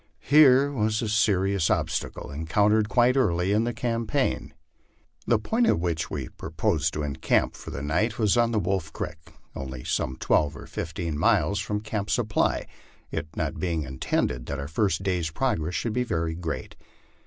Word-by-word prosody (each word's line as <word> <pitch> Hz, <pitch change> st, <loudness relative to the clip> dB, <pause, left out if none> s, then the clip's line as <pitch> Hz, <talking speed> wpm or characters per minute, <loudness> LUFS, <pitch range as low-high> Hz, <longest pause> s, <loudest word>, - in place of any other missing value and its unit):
Here 140 Hz, -1 st, +6 dB
was 110 Hz, -3 st, 0 dB
a -, -, -1 dB
serious 100 Hz, -4 st, +2 dB
obstacle -, -, -2 dB
encountered 105 Hz, +8 st, +2 dB
quite 125 Hz, +1 st, +4 dB
early 90 Hz, -8 st, +2 dB
in 110 Hz, +3 st, +2 dB
the 120 Hz, -, 0 dB
campaign. 115 Hz, -, -1 dB, 0.8 s
The 115 Hz, -, +4 dB
point 225 Hz, -, +1 dB
at -, -, +3 dB
which 85 Hz, -2 st, -1 dB
we -, -, -4 dB
proposed 80 Hz, +1 st, -1 dB
to 75 Hz, -, -2 dB
encamp 70 Hz, -2 st, 0 dB
for -, -, -9 dB
the 70 Hz, -, -5 dB
night 95 Hz, +10 st, 0 dB
was 105 Hz, -4 st, +3 dB
on 120 Hz, -1 st, +3 dB
Wolf 90 Hz, -3 st, -1 dB
creek, 80 Hz, -, -5 dB, 0.4 s
only 65 Hz, -2 st, -6 dB
some 65 Hz, -, -1 dB
twelve 75 Hz, +1 st, +1 dB
or -, -, -9 dB
fifteen 80 Hz, -2 st, -4 dB
miles 100 Hz, +5 st, +3 dB
from 105 Hz, 0 st, -2 dB
Camp 105 Hz, -1 st, -3 dB
Supply, 110 Hz, -4 st, +1 dB, 0.5 s
it 80 Hz, -1 st, -3 dB
not -, -, -2 dB
being 85 Hz, -4 st, -1 dB
in 65 Hz, -1 st, -8 dB
tended -, -, -1 dB
that -, -, -3 dB
our 70 Hz, -, -5 dB
first 90 Hz, +2 st, 0 dB
day's 90 Hz, -4 st, 0 dB
progress 85 Hz, -4 st, -1 dB
should 115 Hz, -, -1 dB
be 125 Hz, -, +1 dB
very 85 Hz, -8 st, -1 dB
great. 80 Hz, -1 st, -5 dB
95 Hz, 170 wpm, -26 LUFS, 80-110 Hz, 0.8 s, Here